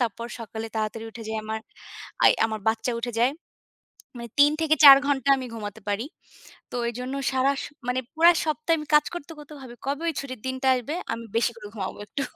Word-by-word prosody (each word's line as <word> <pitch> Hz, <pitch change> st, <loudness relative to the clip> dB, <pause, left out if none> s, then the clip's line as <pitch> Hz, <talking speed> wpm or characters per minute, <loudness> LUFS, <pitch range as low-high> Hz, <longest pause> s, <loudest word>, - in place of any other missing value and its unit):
তারপর 235 Hz, -1 st, -2 dB
সকালে 225 Hz, 0 st, -6 dB
তাড়াতাড়ি 220 Hz, +1 st, -3 dB
উঠে 230 Hz, -, -10 dB
যাই, 220 Hz, -, -2 dB
আমার 220 Hz, 0 st, -4 dB, 0.6 s
আই -, -, +8 dB
আমার 220 Hz, -1 st, -5 dB
বাচ্চা 225 Hz, +2 st, 0 dB
উঠে 240 Hz, 0 st, -3 dB
যায়। 245 Hz, +2 st, +4 dB, 0.9 s
মানে 235 Hz, -1 st, -7 dB
৩ 290 Hz, +1 st, +7 dB
থেকে 315 Hz, -1 st, +3 dB
৪ 275 Hz, -2 st, +12 dB
ঘণ্টা 280 Hz, -1 st, +1 dB
আমি 260 Hz, -, -5 dB
ঘুমাতে 210 Hz, -1 st, -7 dB
পারি। 205 Hz, +4 st, -1 dB, 0.7 s
তো -, -, -6 dB
এইজন্য 250 Hz, +3 st, -5 dB, 0.2 s
সারা 265 Hz, +1 st, +2 dB
স -, -, -6 dB, 0.2 s
মানে 250 Hz, +1 st, +1 dB
পুরা 335 Hz, +2 st, +7 dB
সপ্তাহ 310 Hz, +2 st, 0 dB
আমি 300 Hz, -, -6 dB
কাজ 300 Hz, -, +6 dB
করতে, 340 Hz, -2 st, -7 dB
করতে 295 Hz, 0 st, -12 dB
ভাবি, 245 Hz, -2 st, -10 dB
"কবে 285 Hz, +3 st, -2 dB
ওই -, -, -2 dB
ছুটির 255 Hz, -3 st, -7 dB
দিনটা 260 Hz, 0 st, -2 dB
আসবে? 250 Hz, +5 st, -4 dB, 0.2 s
আমি 230 Hz, 0 st, -6 dB
বেশি 235 Hz, +1 st, +2 dB
করে 210 Hz, -2 st, -10 dB
ঘুমাবো 190 Hz, -3 st, -5 dB
একটু।" 280 Hz, -, -3 dB
250 Hz, 200 wpm, -25 LUFS, 225-280 Hz, 0.9 s, ৪